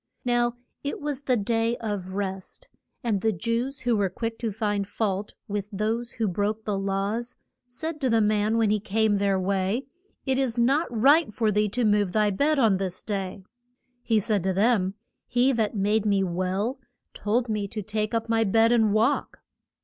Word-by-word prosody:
Now 240 -1 +2 0.3
it 285 - -3
was 290 -2 -3
the 255 -3 +1
Day 225 +2 0
of 200 -4 -4
Rest. 195 - -5 0.3
And 215 -5 0
the 220 - +2
Jews, 235 - -2
who 240 -1 +1
were 200 -2 +1
quick 225 +4 -4
to 230 -2 -2
find 205 -1 -1
fault 205 -1 -2
with 205 -1 -3
those 225 +4 -2
who 225 -2 -1
broke 210 +4 -1
the 210 - -1
laws, 200 +5 -2 0.3
said 305 +5 -5
to 260 - +1
the 230 -1 +3
man 215 +1 +2
when 220 -2 +3
he 210 - +2
came 215 +1 +1
their 200 -1 +1
way, 195 +6 0 0.4
It 265 0 +1
is 250 -3 0
not 270 +7 +3
right 270 +5 +4
for 220 -1 +1
thee 210 +1 +2
to 240 +4 0
move 205 -3 +2
thy 210 -1 +3
bed 290 +10 +2
on 225 -7 +4
this 185 -1 -3
day. 195 -2 -4 0.6
He 225 -3 +2
said 205 -1 0
to 190 +2 0
them, 200 -1 +2 0.3
he 250 +2 +3
that 225 -4 0
made 210 +2 +1
me 200 -1 +3
well 190 +8 -1 0.3
told 230 +4 0
me 210 -2 -1
to 210 +1 -5
take 215 +2 -2
up 225 0 -1
my 225 0 +2
bed 225 +2 +4
and 220 -3 +3
walk. 225 +7 +1
215 Hz, 190 wpm, -26 LUFS, 200-235 Hz, 0.6 s, right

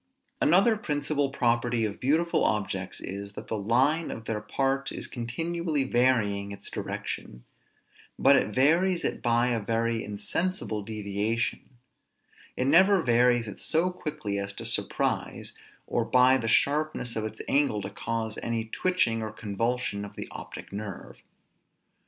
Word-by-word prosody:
Another 195 +8 +5
principal 145 -6 -1
property 120 -3 +1
of 105 -1 -4
beautiful 160 +6 +2
objects 95 -3 -1
is, 100 +1 -6
that - - -9
the - - -1
line 130 +10 +2
of 115 - -6
their 110 -2 -2
parts 135 +5 -1
is - - -4
continually 155 +5 -2
varying 115 -6 +2
its 100 - -4
direction; - - -5 0.7
but 140 +1 +6
it - - +3
varies 170 - +3
it - - -2
by 120 +1 +2
a 120 -2 +1
very 115 +1 0
insensible 110 - -2
deviation; 110 +4 -2 0.8
it 125 - 0
never 185 +5 +5
varies 120 -1 +3
it 100 - -8
so 165 +3 +1
quickly 150 - -4
as 100 0 -4
to - - -7
surprise, - - -1 0.3
or 120 - 0
by 125 +2 +5
the 115 -4 -1
sharpness 140 0 +1
of 110 - -1
its 110 - -6
angle 135 -8 +2
to 100 - -5
cause 110 +1 -3
any 115 -1 -2
twitching 115 -3 +1
or 110 -1 -4
convulsion 110 0 -2
of 100 - -9
the - - -5
optic - - -9
nerve. 100 -2 -7
120 Hz, 145 wpm, -28 LUFS, 105-145 Hz, 0.8 s, but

